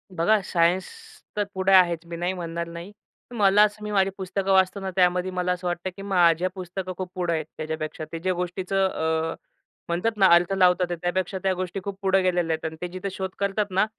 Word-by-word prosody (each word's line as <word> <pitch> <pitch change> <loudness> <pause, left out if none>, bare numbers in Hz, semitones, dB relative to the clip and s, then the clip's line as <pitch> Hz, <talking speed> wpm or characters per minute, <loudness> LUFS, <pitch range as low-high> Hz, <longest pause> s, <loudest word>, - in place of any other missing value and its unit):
बघा 210 +6 +3
सायन्स 175 +2 +2 0.5
तर 205 - +2
पुढे 190 0 +1
आहेच 175 -3 +5
मी 170 0 -7
नाही 175 +2 -1
म्हणणार 170 -1 -4
नाही. 170 +3 -8 0.4
मला 205 -1 +5
असं 210 0 -1
मी 210 - -4
माझी 195 -1 +3
पुस्तकं 195 0 -2
वाचतो 190 +1 +3
ना, 190 -1 -4
त्यामध्ये 180 0 +2
मला 180 0 -1
असं 180 0 -3
वाटतं, 175 +1 -2
की 195 - -9
माझ्या 180 -3 +3
पुस्तकं 185 0 -5
खूप 185 -1 -4
पुढं 175 -2 -1
आहेत 160 -2 -2
त्याच्यापेक्षा 155 0 -4
ते 165 - -5
ज्या 185 +2 0
गोष्टीचं 185 +2 -1
अ, 160 -1 -1 0.5
म्हणतात 195 +6 -1
ना 195 - +5
अर्थ 175 +2 +2
लावतात 180 -1 +3
त्यापेक्षा 185 +2 -1
त्या 190 -1 +2
गोष्टी 185 +1 -4
खूप 200 0 -5
पुढं 195 -1 +3
गेलेल्या 175 -3 +1
आहेत 160 - -4
आणि 160 0 -4
ते 180 - -2
जिथं 185 +2 -4
शोध 190 0 -4
करतात 200 +1 0
ना, 190 +3 +3
185 Hz, 205 wpm, -25 LUFS, 170-195 Hz, 0.5 s, आहेच